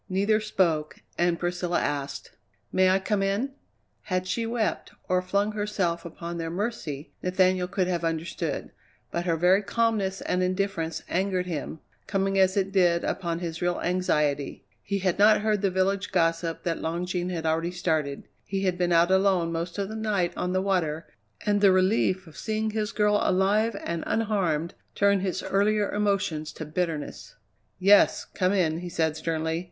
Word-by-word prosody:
Neither 200 +3 +2
spoke 170 -8 0
and 175 0 +1
Priscilla 175 0 -1
asked: 140 -1 -3 0.4
"May 185 0 +4
I 190 - +4
come 195 +1 -1
in?" 200 +8 0 0.5
Had 185 -2 -1
she 225 +5 -1
wept, 225 -2 -2
or 180 0 +2
flung 200 +3 0
herself 205 -5 -1
upon 170 +1 -6
their 165 0 -3
mercy, 170 -7 -4
Nathaniel 185 0 +2
could 185 0 0
have 175 -2 -1
understood, 165 +1 -3 0.4
but 170 0 -2
her 165 - +2
very 180 +4 +4
calmness 210 -3 0
and 180 - 0
indifference 185 -3 -1
angered 185 0 0
him, 160 -2 -5 0.3
coming 195 -1 +1
as 190 +1 +3
it 195 0 +1
did 175 -3 +3
upon 170 -3 -2
his 170 -1 -4
real 175 0 0
anxiety. 150 -6 0 0.2
He 200 - -2
had 185 -1 0
not 215 +1 +6
heard 210 -2 +1
the 200 - +2
village 190 +2 0
gossip 165 -2 0
that 170 -1 -2
Long 170 +2 -2
Jean 180 0 -2
had 165 -3 -3
already 160 +2 +1
started. 160 -6 -1 0.2
He 195 0 -3
had 180 -2 0
been 175 -1 +1
out 170 +2 +4
alone 190 -3 +3
most 170 +2 -3
of 200 -1 -1
the 215 - -7
night 210 -5 0
on 180 - -2
the 185 +1 +1
water, 165 -5 0 0.4
and 205 -1 +2
the 200 -2 +7
relief 185 0 +2
of 160 - -15
seeing 220 0 -2
his 215 0 -2
girl 210 -1 +2
alive 205 +5 +2
and 170 -1 -3
unharmed 190 -8 0 0.2
turned 200 -1 +3
his 185 -2 -2
earlier 205 +1 +1
emotions 195 -7 0
to 160 - -6
bitterness. 155 -1 -4 0.4
"Yes, 200 +2 +5
come 185 -1 0
in," 165 -5 +1
he 175 0 -6
said 160 -2 0
sternly. 160 0 -1
185 Hz, 170 wpm, -26 LUFS, 170-200 Hz, 0.5 s, the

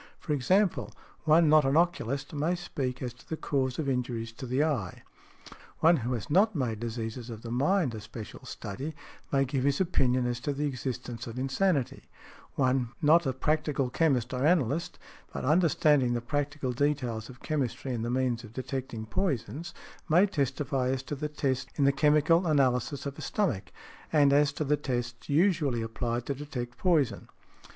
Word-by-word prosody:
For 150 - -3
example, 185 +8 +2 0.3
one 160 +1 +5
not 155 0 +6
an 135 +3 +2
oculist 145 -6 0
may 155 +4 0
speak 135 -8 -4
as 125 -2 -4
to 120 - -20
the 160 - -3
cause 130 -4 -1
of 155 - -2
injuries 120 -3 -2
to 130 +3 -8
an 130 +4 +2
eye; 130 - -2 0.8
one 165 +1 +5
who 125 +1 -2
has 120 - -4
not 195 +6 +3
made 120 -7 -1
diseases 115 +1 -5
of 115 -1 -8
the 115 - -6
mind 145 +3 +2
a 110 - -6
special 110 0 -9
study 135 +10 -6 0.4
may 135 -1 +3
give 130 0 -1
his 140 0 +2
opinion 130 -9 +2
as 120 -1 -1
to 145 +3 -2
the 145 +2 -2
existence 125 -3 -4
of 115 +1 -7
insanity; 135 +2 0 0.5
one 130 -2 +1
not 160 0 +5
a - - +2
practical 140 -1 0
chemist 130 -7 +1
or 125 +1 -1
analyst, 155 -1 +1 0.3
but - - -4
understanding 150 -4 +3
the 120 - 0
practical 145 +2 -2
details 125 -5 -1
of 125 -1 -13
chemistry 135 -3 -2
and 115 -2 -2
the 120 - -2
means 125 -1 0
of 110 -1 -12
detecting 130 -3 -4
poisons, 165 - -2 0.4
may 175 +5 +6
testify 140 -6 -1
as 130 0 -1
to 140 - -6
the 150 +1 -3
tests 135 -3 -1
in 145 - +1
the 140 - +6
chemical 150 +5 +3
analysis 135 -2 +1
of 140 0 -5
a - - -6
stomach, 120 - -1 0.4
and 145 -3 +5
as 145 0 +4
to 150 - -3
the 150 +1 +2
tests 120 -3 -4
usually 145 - +2
applied 120 +1 -3
to 140 - -1
detect 130 -4 -6
poison. 165 -8 +1
135 Hz, 175 wpm, -29 LUFS, 125-150 Hz, 0.8 s, not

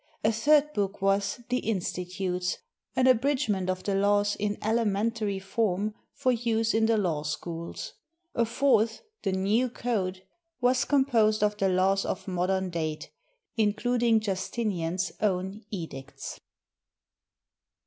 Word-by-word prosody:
A 215 - +4
third 295 +6 +3
book 200 -3 -1
was 200 +3 +1
"The 250 0 +1
Insti 185 -4 -2
tutes," 180 -1 -1 0.4
an 255 - +3
abridgment 255 -7 +2
of 185 0 -2
the 200 - -1
laws 205 +1 +2
in 205 0 -2
elementary 215 -1 0
form 200 +1 -1 0.2
for 260 -3 +1
use 225 -2 +1
in 220 0 +3
the 225 -1 +3
law 170 -7 0
schools. 165 +3 -5 0.4
A 235 - +2
fourth, 230 -2 +2 0.2
"The 195 - 0
New 210 +7 +2
Code," 195 -7 -2 0.4
was 250 0 +3
composed 230 -7 +3
of 210 0 +2
the 195 -2 +2
laws 190 +1 +2
of 185 - -4
modern 185 0 0
date, 155 -2 -3 0.5
including 225 +2 +2
Justinian's 190 -3 -2
own 195 +1 -1
edicts. 145 -8 -7
205 Hz, 130 wpm, -28 LUFS, 185-230 Hz, 0.5 s, A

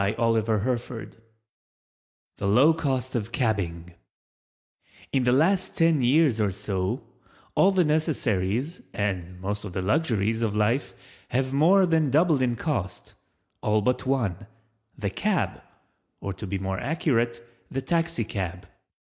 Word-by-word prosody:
THE 115 +3 +1 2.0
LOW 120 +11 +5
COST 130 -5 -1
OF 115 -2 -2
CABBING 90 -8 -1 1.2
In 135 -2 +2
the 125 - +4
last 180 +8 +2
ten 165 -3 +3
years 130 -2 +3
or 105 - +2
so 95 -1 -2 0.5
all 190 - +5
the 190 -2 +3
necessaries 145 - 0
and 90 -3 -3
most 100 +2 -3
of 100 -4 -7
the 95 - -2
luxuries 115 - +1
of 110 -3 0
life 110 +6 +1 0.3
have 130 +2 -1
more 180 +7 +5
than 160 -4 +2
doubled 155 0 +3
in 120 -2 +1
cost—all 105 - -3
but 125 +3 0
one—the 115 -2 -4
Cab—or 180 - -4
to 105 - -7
be 100 +1 -2
more 95 0 -3
accurate, 120 -7 0 0.2
the 135 0 -3
Taxi 165 -3 0
cab. 95 -3 -5
115 Hz, 120 wpm, -26 LUFS, 100-150 Hz, 2.0 s, LOW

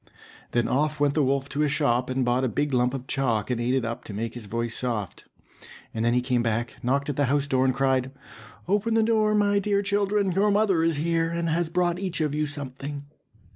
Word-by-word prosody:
Then 120 -1 +1
off 150 +2 0
went 145 -1 +2
the 155 - +2
wolf 135 0 +1
to 140 +2 -2
a 150 - +3
shop 130 -4 +1
and 130 0 0
bought 125 +2 +1
a - - +2
big 140 +6 -1
lump 125 +1 +2
of 130 -1 -6
chalk, 125 -5 -1
and 120 -1 -1
ate 125 +2 +1
it 130 -3 0
up 115 0 -4
to 105 - -7
make 115 +2 -3
his 120 -4 -9
voice 115 +2 -2
soft. 115 -7 -3 0.7
And 110 - -2
then 120 +1 +2
he 125 - +3
came 125 -2 +1
back, 115 +1 -1
knocked 140 +4 0
at 135 - -8
the 145 - +3
house 140 +2 +1
door, 130 -2 +1
and 130 - +2
cried, 130 -1 +1 0.6
"Open 210 +4 +1
the 225 - +4
door, 215 -1 +2
my 205 -1 +3
dear 200 0 0
children, 200 -1 +1
your 195 +4 +2
mother 200 -4 +2
is 165 -1 +2
here, 165 +2 0
and 170 0 -2
has 165 +1 0
brought 175 0 0
each 185 -3 -3
of 150 -2 0
you 150 0 0
something." 140 0 -6
140 Hz, 235 wpm, -25 LUFS, 125-170 Hz, 0.7 s, the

